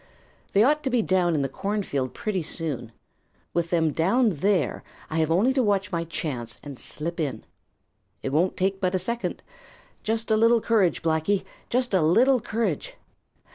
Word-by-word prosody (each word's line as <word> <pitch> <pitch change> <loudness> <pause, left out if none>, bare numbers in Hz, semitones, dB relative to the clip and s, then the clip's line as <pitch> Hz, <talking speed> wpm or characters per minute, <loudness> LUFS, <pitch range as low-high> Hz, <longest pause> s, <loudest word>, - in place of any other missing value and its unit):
They 200 - +5
ought 300 +4 +3
to 270 - -1
be 245 -3 +2
down 180 -4 +2
in 145 - +1
the - - 0
cornfield 145 - -2
pretty 205 -4 -2
soon. 150 -7 -3 0.6
With 170 -1 0
them 165 -3 +2
down 215 +8 +3
there, 185 +1 0 0.3
I 160 - -1
have 160 -1 +2
only 200 +11 +3
to 265 - +2
watch 200 -4 +1
my 170 -1 -1
chance 140 -8 -4
and 140 -3 -8
slip 170 +3 -4
in. 135 -8 -2 0.8
It - - -1
won't 175 +5 +2
take 190 +1 0
but 185 0 +1
a - - +4
second. 235 +6 -3 0.6
Just 225 +1 -1
a - - +5
little 230 +2 +5
courage, 210 -8 +2
Blacky, 165 +5 +1 0.3
just 245 -2 0
a 185 - +4
little 245 +12 +4
courage! 235 - -2
185 Hz, 175 wpm, -25 LUFS, 160-225 Hz, 0.8 s, They